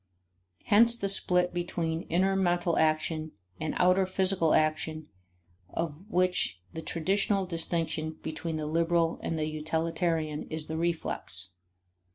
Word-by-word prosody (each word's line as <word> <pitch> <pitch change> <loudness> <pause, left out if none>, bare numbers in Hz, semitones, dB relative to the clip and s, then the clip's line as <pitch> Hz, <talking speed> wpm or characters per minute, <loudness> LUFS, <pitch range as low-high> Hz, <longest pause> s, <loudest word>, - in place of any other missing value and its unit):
Hence 230 +3 +5
the 200 -4 -2
split 180 -2 +4
between 170 -2 -3
inner 190 +3 +2
mental 175 -2 +1
action 155 0 0 0.3
and 155 0 -3
outer 185 +1 +3
physical 185 -3 +3
action 155 0 0 0.6
of 165 +4 -5
which 180 - +1
the 160 - -5
traditional 195 +4 0
distinction 165 -2 -2
between 160 +1 -4
the 155 -1 -3
liberal 165 +1 +1
and 165 - -3
the 155 - -1
utilitarian 160 0 -2
is 160 -1 -3
the 160 - -5
reflex. 160 - -1
165 Hz, 125 wpm, -29 LUFS, 155-180 Hz, 0.6 s, Hence